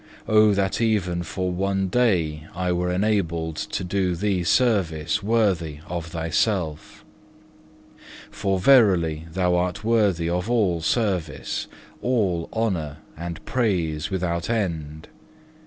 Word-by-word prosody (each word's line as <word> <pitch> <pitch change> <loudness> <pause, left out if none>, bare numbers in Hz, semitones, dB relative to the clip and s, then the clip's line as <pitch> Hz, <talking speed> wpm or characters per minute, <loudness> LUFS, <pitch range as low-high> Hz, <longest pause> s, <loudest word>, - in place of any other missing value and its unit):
Oh 110 0 +5
that 95 +2 0
even 95 -6 +1
for 90 +2 -3
one 95 +1 0
day 85 -9 +1
I 90 0 -1
were 90 0 0
enabled 85 -5 0
to - - -3
do 90 -1 0
Thee 95 0 0
service 90 -8 +1
worthy 95 -9 0
of 85 -1 -5
Thyself! 80 0 -2 1.3
For 95 -1 -1
verily 90 - +4
Thou 90 0 +1
art 90 +3 -1
worthy 105 -7 +2
of 90 +5 -1
all 100 -9 +1
service, 90 -6 -1 0.3
all 100 -9 0
honour, 90 -10 -2 0.2
and 85 +1 -7
praise 90 -9 0
without 85 -2 -2
end. 80 -9 -2
90 Hz, 115 wpm, -24 LUFS, 85-105 Hz, 1.3 s, Oh